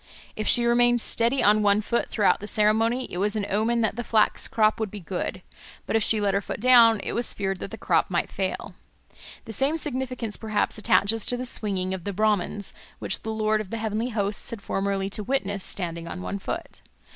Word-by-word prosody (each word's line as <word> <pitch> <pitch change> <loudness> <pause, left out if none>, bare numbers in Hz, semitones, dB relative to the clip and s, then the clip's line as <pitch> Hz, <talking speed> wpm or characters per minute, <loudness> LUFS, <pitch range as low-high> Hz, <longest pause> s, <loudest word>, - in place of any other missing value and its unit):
If 215 - -3
she 240 -1 +4
remained 240 0 +4
steady 235 +3 +1
on 210 +1 +5
one 205 0 +3
foot 235 +3 -1
throughout 210 -3 +2
the 205 - -7
ceremony, 225 +4 +2
it 175 - -3
was 205 +2 +1
an 210 -2 -1
omen 225 +4 +1
that 220 -1 0
the 240 - -2
flax 220 -2 +2
crop 215 0 +2
would 220 -2 -2
be 210 - -8
good; 185 +1 -5 0.4
but - - -2
if 225 - +3
she 220 - +3
let 200 -1 +1
her 200 - +1
foot - - -6
down, 230 -2 +6
it - - -4
was 240 0 -1
feared 195 -2 -2
that - - -6
the - - -8
crop - - +1
might - - -1
fail. - - -3 0.7
The 225 - -7
same 275 +8 +1
significance 255 -7 -4
perhaps 215 0 -1
attaches 215 +1 +2
to 245 - +3
the 250 - -4
swinging 195 -6 0
of 190 -2 -5
the 200 - -3
Brahmans, 205 -1 0 0.2
which - - -1
the 220 - -6
Lord 215 -1 0
of 205 - -9
the 230 - -4
Heavenly 220 +2 -2
Hosts 205 -3 -2
had 230 -4 -6
formerly 195 0 -1
to 210 - -2
witness 200 -5 -1
standing 170 -3 -3
on 90 - -6
one 90 +2 -4
foot. - - -6
215 Hz, 215 wpm, -25 LUFS, 200-230 Hz, 0.7 s, down